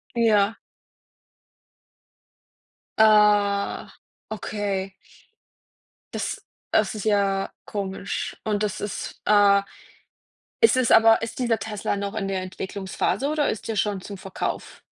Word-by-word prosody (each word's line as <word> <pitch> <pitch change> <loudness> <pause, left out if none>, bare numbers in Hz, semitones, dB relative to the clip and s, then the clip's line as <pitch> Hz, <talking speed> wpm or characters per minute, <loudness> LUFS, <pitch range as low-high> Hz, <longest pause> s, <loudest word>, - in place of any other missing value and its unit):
Ja. 220 -2 +3 2.4
Ah, 210 -2 +3 0.4
okay. 200 -3 -3 1.2
Das - - -3 0.3
das 215 -1 +2
ist 210 - -5
ja 200 -2 +1
komisch. 195 -1 -4
Und 210 -1 -1
das 205 - -2
ist, 205 - -5
äh 205 -1 +5 1.0
es 455 - +7
ist 255 -2 +2
aber 225 0 +6
ist 225 +2 -5
dieser 235 -3 +1
Tesla 210 -1 -3
noch 200 +1 -4
in 215 -3 -2
der 190 -1 -2
Entwicklungsphase 190 +7 -3
oder 300 -1 +1
ist 220 - -6
der 225 - -2
schon 205 -1 0
zum 200 -1 -8
Verkauf? 190 0 -5
205 Hz, 110 wpm, -24 LUFS, 200-220 Hz, 2.4 s, es